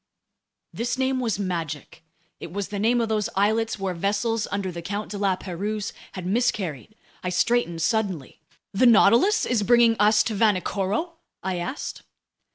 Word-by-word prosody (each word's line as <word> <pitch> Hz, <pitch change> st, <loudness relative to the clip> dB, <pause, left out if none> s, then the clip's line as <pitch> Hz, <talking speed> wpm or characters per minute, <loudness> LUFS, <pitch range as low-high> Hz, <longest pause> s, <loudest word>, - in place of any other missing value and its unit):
This 240 Hz, +2 st, -2 dB
name 260 Hz, 0 st, 0 dB
was 230 Hz, -6 st, -1 dB
magic! 165 Hz, -5 st, -4 dB, 0.4 s
It 165 Hz, -, -8 dB
was 200 Hz, +1 st, -4 dB
the 205 Hz, -, -4 dB
name 235 Hz, +4 st, +2 dB
of 230 Hz, -, 0 dB
those 215 Hz, -2 st, 0 dB
islets 220 Hz, +3 st, +1 dB
where 195 Hz, -2 st, -2 dB
vessels 205 Hz, +5 st, -1 dB
under 200 Hz, -2 st, -2 dB
the 170 Hz, 0 st, -7 dB
Count 205 Hz, +4 st, -4 dB
de 205 Hz, -, -4 dB
La 195 Hz, -2 st, +2 dB
Pérouse 200 Hz, +4 st, -4 dB, 0.2 s
had 185 Hz, -2 st, -6 dB
miscarried. 200 Hz, -, -1 dB, 0.3 s
I 180 Hz, -, -1 dB
straightened 180 Hz, -3 st, +1 dB
suddenly. 195 Hz, -, -1 dB, 0.3 s
"The 245 Hz, +6 st, +4 dB
Nautilus 240 Hz, -, +5 dB
is 240 Hz, -4 st, +1 dB
bringing 235 Hz, +1 st, +5 dB
us 210 Hz, +1 st, +5 dB
to 225 Hz, -, -2 dB
Vanikoro?" 210 Hz, -, 0 dB, 0.3 s
I 185 Hz, -1 st, -2 dB
asked. 255 Hz, +12 st, -5 dB
205 Hz, 160 wpm, -24 LUFS, 185-230 Hz, 0.4 s, Nautilus